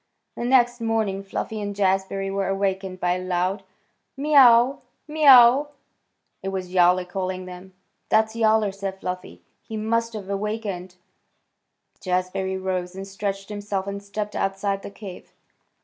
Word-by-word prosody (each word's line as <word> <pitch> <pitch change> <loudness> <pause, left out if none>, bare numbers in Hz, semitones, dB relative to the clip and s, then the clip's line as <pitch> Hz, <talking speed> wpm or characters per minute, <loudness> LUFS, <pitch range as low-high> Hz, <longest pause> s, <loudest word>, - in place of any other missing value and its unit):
The 235 - -4
next 245 -1 +3
morning 220 -4 0
Fluffy 210 +2 -4
and 205 -1 -4
Jazbury 195 0 0
were 195 -1 -1
awakened 190 -1 -2
by 180 0 +1
a 185 - -6
loud 185 +2 -1 0.6
"Miaw 295 +2 -1
aw 245 -4 +9
aw! - - -19 0.3
Miaw 305 0 0
aw 240 +2 +7
aw!" 295 - -6 0.7
It - - -6
was 185 -1 -5
Yowler 180 0 +4
calling 185 0 -4
them. 185 +1 -11 0.3
"That's 220 +1 +2
Yowler," 220 -2 +3
said 195 0 -6
Fluffy. 180 - -6 0.2
"He 220 - -7
must 230 +2 -1
have 205 -3 -7
awakened." 200 -3 -4 1.0
Jazbury 185 +1 -2
rose 185 -1 -3
and 195 0 -7
stretched 195 0 -4
himself 205 -2 -3
and 200 0 -5
stepped 205 +1 -5
outside 195 0 -1
the - - -8
cave. 200 -2 -11
195 Hz, 150 wpm, -24 LUFS, 185-220 Hz, 1.0 s, aw